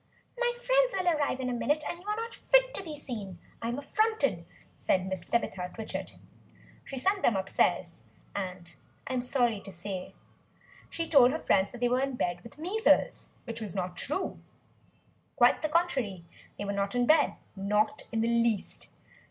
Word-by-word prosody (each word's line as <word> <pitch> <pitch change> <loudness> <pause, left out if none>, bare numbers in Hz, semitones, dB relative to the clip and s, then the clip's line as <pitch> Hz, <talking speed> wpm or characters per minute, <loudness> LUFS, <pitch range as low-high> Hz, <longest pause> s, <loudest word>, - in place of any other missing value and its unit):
"My 485 0 +1
friends - - +3
will 370 -1 -1
arrive 290 -3 0
in 260 - -2
a 250 - -1
minute, 295 +5 +1
and 345 - -4
you 390 - -15
are 420 - 0
not 455 +1 -4
fit - - +3
to - - -1
be 315 -4 -6
seen; 215 - -6 0.2
I 230 - -2
am 240 - -2
affronted," 285 - 0 0.3
said 185 - +1
Mrs. 185 -2 -4
Tabitha 185 -6 0
Twitchit. 220 -1 -5 0.7
She 270 - -7
sent 385 +9 +1
them 230 - +3
upstairs; 190 0 0 0.3
and 185 -3 -5 0.3
I - - -4
am 255 - +1
sorry 245 -4 +1
to 195 - -10
say 185 +1 -5 0.7
she 330 0 -3
told 270 -6 +7
her 300 - -1
friends 190 +1 +3
that 245 - -10
they 245 - +4
were 250 +2 +2
in 275 -1 -1
bed 175 -6 -1
with 235 - -12
the 305 - -10
measles; 440 +6 +2
which 230 -1 -6
was 205 -3 -4
not 180 -2 -2
true. 305 - -2 1.0
Quite 245 -4 +5
the 310 - 0
contrary; 260 - 0 0.3
they 205 - -4
were 200 - -2
not 200 +2 -1
in 245 0 +3
bed: 310 +3 +4 0.2
not 210 +7 +1
in 225 -1 0
the 225 - +1
least. 235 -3 0
245 Hz, 185 wpm, -30 LUFS, 200-315 Hz, 1.0 s, told